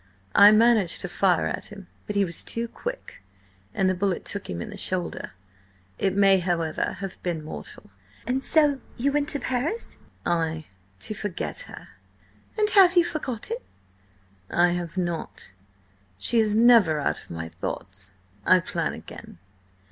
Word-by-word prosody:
"I 205 Hz, -, +9 dB
managed 215 Hz, -4 st, +4 dB
to 195 Hz, -, -4 dB
fire 180 Hz, -1 st, +2 dB
at -, -, -3 dB
him, 200 Hz, -2 st, -11 dB, 0.2 s
but 210 Hz, -, -4 dB
he 200 Hz, -1 st, +3 dB
was 170 Hz, -2 st, -5 dB
too 230 Hz, +1 st, -2 dB
quick, -, -, -7 dB, 0.5 s
and 195 Hz, -4 st, +1 dB
the 185 Hz, -, +3 dB
bullet 185 Hz, 0 st, -1 dB
took 200 Hz, -, -4 dB
him 85 Hz, -, -4 dB
in -, -, -6 dB
the -, -, -8 dB
shoulder. 180 Hz, -2 st, -3 dB, 0.7 s
It 195 Hz, -1 st, +1 dB
may, 195 Hz, -1 st, +5 dB
however, 170 Hz, -3 st, -1 dB
have 195 Hz, -2 st, -7 dB
been 170 Hz, -3 st, -3 dB
mortal." 150 Hz, -, -9 dB, 0.3 s
"And 260 Hz, +3 st, -1 dB
so 290 Hz, -3 st, +3 dB, 0.2 s
you 275 Hz, +4 st, +1 dB
went 290 Hz, 0 st, 0 dB
to 285 Hz, -, -1 dB
Paris?" 275 Hz, -, -2 dB, 0.3 s
"Ay. 160 Hz, -2 st, 0 dB, 0.4 s
To -, -, -2 dB
forget 205 Hz, -, -4 dB
her." -, -, -11 dB, 0.7 s
"And 425 Hz, -1 st, +3 dB
have 370 Hz, -3 st, +6 dB
you 345 Hz, -, +6 dB
forgotten?" 305 Hz, -, -3 dB, 0.9 s
"I 175 Hz, +1 st, +4 dB
have 175 Hz, 0 st, -3 dB
not. 175 Hz, -, -4 dB, 0.7 s
She 230 Hz, -, +2 dB
is 215 Hz, -1 st, +2 dB
never 220 Hz, -9 st, +6 dB
out 145 Hz, -, -1 dB
of -, -, -18 dB
my 80 Hz, -1 st, -5 dB
thoughts. 95 Hz, +3 st, -6 dB, 0.3 s
I 185 Hz, -, +6 dB
plan 170 Hz, -, -2 dB
again." -, -, -11 dB
195 Hz, 155 wpm, -25 LUFS, 170-245 Hz, 0.9 s, I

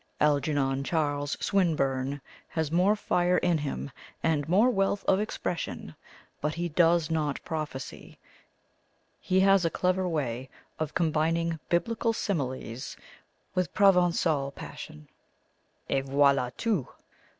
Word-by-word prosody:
Algernon 140 Hz, -2 st, +1 dB
Charles 145 Hz, -2 st, -1 dB
Swinburne 140 Hz, -7 st, 0 dB, 0.3 s
has 160 Hz, -2 st, -2 dB
more 185 Hz, +5 st, +4 dB
fire 180 Hz, -3 st, +1 dB
in 175 Hz, -3 st, +2 dB
him, 70 Hz, -, -4 dB, 0.3 s
and 155 Hz, -2 st, +1 dB
more 210 Hz, +8 st, +5 dB
wealth 195 Hz, -2 st, 0 dB
of 190 Hz, -, +3 dB
expression, 205 Hz, -4 st, -4 dB, 0.5 s
but 150 Hz, +1 st, -1 dB
he 175 Hz, +1 st, -2 dB
does 165 Hz, 0 st, +3 dB
not 150 Hz, -3 st, 0 dB
prophesy; 155 Hz, -5 st, -6 dB, 1.0 s
he 185 Hz, 0 st, +1 dB
has 195 Hz, -1 st, +5 dB
a 165 Hz, -, +2 dB
clever 185 Hz, +2 st, 0 dB
way 130 Hz, -5 st, -2 dB, 0.3 s
of 155 Hz, -1 st, -3 dB
combining 165 Hz, 0 st, +1 dB
Biblical 230 Hz, +6 st, +1 dB
similes 130 Hz, -, -3 dB, 0.6 s
with 180 Hz, -4 st, -1 dB
Provengal 175 Hz, -7 st, +3 dB
passion 75 Hz, 0 st, -9 dB, 0.8 s
et 135 Hz, -, 0 dB
voila 140 Hz, -2 st, +3 dB
tout! 210 Hz, -, 0 dB
160 Hz, 115 wpm, -28 LUFS, 140-180 Hz, 1.0 s, more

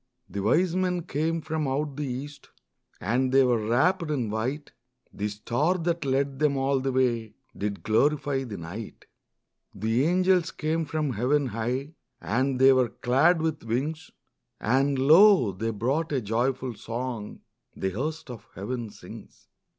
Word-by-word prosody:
The 100 Hz, +2 st, -5 dB
wise 165 Hz, -, +2 dB
men 180 Hz, -2 st, 0 dB
came 165 Hz, +1 st, -1 dB
from 155 Hz, -1 st, -2 dB
out 140 Hz, +1 st, -2 dB
the 145 Hz, 0 st, -3 dB
east, 140 Hz, +3 st, -7 dB, 0.5 s
And 125 Hz, +6 st, 0 dB
they 135 Hz, 0 st, +6 dB
were 120 Hz, -4 st, +1 dB
wrapped 165 Hz, -, +2 dB
in 125 Hz, -8 st, -1 dB
white; 130 Hz, +8 st, -3 dB, 0.4 s
The 105 Hz, -, -2 dB
star 120 Hz, -, 0 dB
that 170 Hz, -2 st, -1 dB
led 135 Hz, 0 st, 0 dB
them 150 Hz, -2 st, +2 dB
all 135 Hz, 0 st, +1 dB
the 135 Hz, +1 st, -1 dB
way 120 Hz, -4 st, 0 dB, 0.2 s
Did 100 Hz, 0 st, -4 dB
glorify 140 Hz, +4 st, +1 dB
the 110 Hz, -5 st, -6 dB
night. 95 Hz, +7 st, -8 dB, 0.7 s
The 115 Hz, +5 st, +1 dB
angels 180 Hz, 0 st, +3 dB
came 160 Hz, +1 st, -2 dB
from 150 Hz, -3 st, -2 dB
heaven 135 Hz, +6 st, +1 dB
high, 125 Hz, +7 st, -3 dB, 0.3 s
And 130 Hz, +3 st, 0 dB
they 135 Hz, 0 st, +7 dB
were 130 Hz, -2 st, +2 dB
clad 145 Hz, +9 st, +2 dB
with 160 Hz, -2 st, -2 dB
wings; 145 Hz, +7 st, -3 dB, 0.5 s
And 135 Hz, +4 st, +1 dB
lo, 160 Hz, -, +6 dB
they 110 Hz, +5 st, -3 dB
brought 130 Hz, +10 st, -1 dB
a 135 Hz, -, +2 dB
joyful 125 Hz, +3 st, -1 dB
song 115 Hz, -1 st, -5 dB, 0.3 s
The 95 Hz, -, -2 dB
host 150 Hz, -, -4 dB
of 115 Hz, -, -10 dB
heaven 115 Hz, +3 st, -4 dB
sings. -, -, -13 dB
135 Hz, 150 wpm, -26 LUFS, 115-155 Hz, 0.7 s, they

